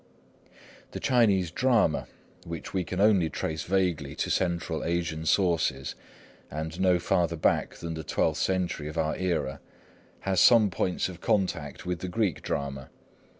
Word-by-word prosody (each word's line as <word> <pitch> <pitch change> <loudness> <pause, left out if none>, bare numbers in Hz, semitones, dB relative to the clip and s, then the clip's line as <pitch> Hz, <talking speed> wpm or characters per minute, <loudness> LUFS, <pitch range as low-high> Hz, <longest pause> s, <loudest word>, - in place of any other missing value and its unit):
The - - -4
Chinese 100 -9 +3
drama, 115 -6 +2 0.4
which 85 -1 -7
we 95 -2 0
can 90 +2 -5
only 100 -5 +4
trace 80 0 -3
vaguely 95 -3 0
to - - -2
Central 85 -2 -1
Asian 85 -2 -2
sources, 80 -9 +1 0.6
and 80 +3 -5
no 90 -1 +4
farther 85 0 +1
back 80 - +1
than 85 -1 -5
the 80 -1 -5
twelfth - - 0
century 90 -5 -1
of 75 +2 -7
our 80 -1 0
era, 80 -7 -1 0.6
has 95 -2 +1
some 110 -1 +6
points 90 +1 -1
of 90 -2 -10
contact 85 -7 -1
with 90 -1 -2
the 95 - -4
Greek 100 -3 0
drama. 70 -2 -4
85 Hz, 150 wpm, -28 LUFS, 80-95 Hz, 0.6 s, some